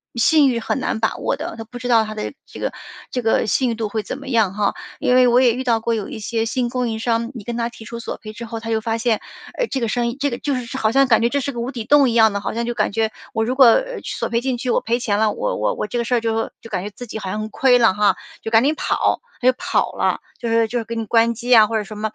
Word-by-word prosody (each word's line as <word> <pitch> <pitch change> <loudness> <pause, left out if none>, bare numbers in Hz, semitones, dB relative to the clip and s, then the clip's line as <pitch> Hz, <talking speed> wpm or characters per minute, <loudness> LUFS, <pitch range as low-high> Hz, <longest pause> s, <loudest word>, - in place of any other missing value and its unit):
信 285 +4 +4
誉 240 -2 0
很 250 - -2
难 220 - -2
把 220 - 0
握 - - -1
的， - - -5
它 225 - -6
不 245 +2 -10
知 245 - -5
道 230 -2 +5
它 215 0 -6
的 215 +5 -5
这 - - -11
个 - - -2 0.4
这 250 - -1
个 225 -1 +1
信 250 +5 +2
誉 230 - -1
度 225 -1 -2
会 215 +1 -3
怎 260 - -5
么 275 - -11
样 225 -7 +2
哈。 205 0 0 0.3
因 250 - +2
为 255 0 +6
我 245 +1 +5
也 245 -3 +4
遇 255 +3 -3
到 235 -3 +2
过 230 +1 -1
有 215 -3 -3
一 225 - -7
些 225 +1 -1
新 240 +2 -1
供 250 -1 -1
应 220 -1 -3
商， 230 +1 -1
你 225 - -7
跟 235 +3 -4
它 235 0 -1
提 230 -2 -13
出 235 +1 -7
索 235 - -5
赔 215 -1 -10
之 230 - -8
后， 230 0 -6
它 225 0 -7
就 220 -1 +1
发 225 +1 -1
现， 225 -1 0 0.4
呃， - - 0
这 270 - -2
个 235 - -1
生 240 +2 0
意 235 - -6
这 285 0 +1
个 240 - -3
就 285 -2 -1
是 250 +1 -5
好 220 -4 +1
像 270 +2 +4
感 230 -3 +4
觉 235 - +3
这 280 - 0
是 280 +1 -2
个 240 - -6
无 245 +3 -3
底 235 -5 -6
洞 285 -1 +5
一 - - -1
样 220 -2 +5
的， 200 - -2
好 - - -3
像 235 +1 -2
就 240 - -2
感 215 -3 0
觉 220 +1 0 0.2
我 220 0 0
如 250 +3 -1
果， 265 -1 +7
呃， - - +2
索 - - -3
赔 235 0 0
进 260 -1 -1
去， 250 +1 -4
我 - - +2
赔 235 +2 0
钱 210 -4 0
了， 220 -1 +3
我 - - -2
我 - - 0
我 - - -3
这 225 - -3
个 - - 0
事 245 - +1
儿 - - +3
就 225 0 -1
就 230 - -11
感 185 -4 -2
觉 205 - -4
自 245 +5 -10
己 220 - -6
好 195 - -5
像 210 - -3
很 215 - -5
亏 250 +2 +4
了， 230 -5 +5
哈， 200 -1 +3 0.3
就 225 - -5
赶 225 +1 +5
紧 295 +3 +2
跑。 - - 0 0.2
它 250 - +2
就 - - +4
跑 - - 0
了， - - 0 0.2
就 235 - -4
是 230 0 +3
就 240 +3 -3
是 235 - -1
给 230 +1 -6
你 225 - -2
关 230 +1 +3
机 245 +2 +2
啊， 220 -1 +8
或 225 +1 -1
者 210 - -2
什 215 +1 -9
么， 215 0 -2
230 Hz, 355 characters per minute, -20 LUFS, 220-250 Hz, 0.4 s, 啊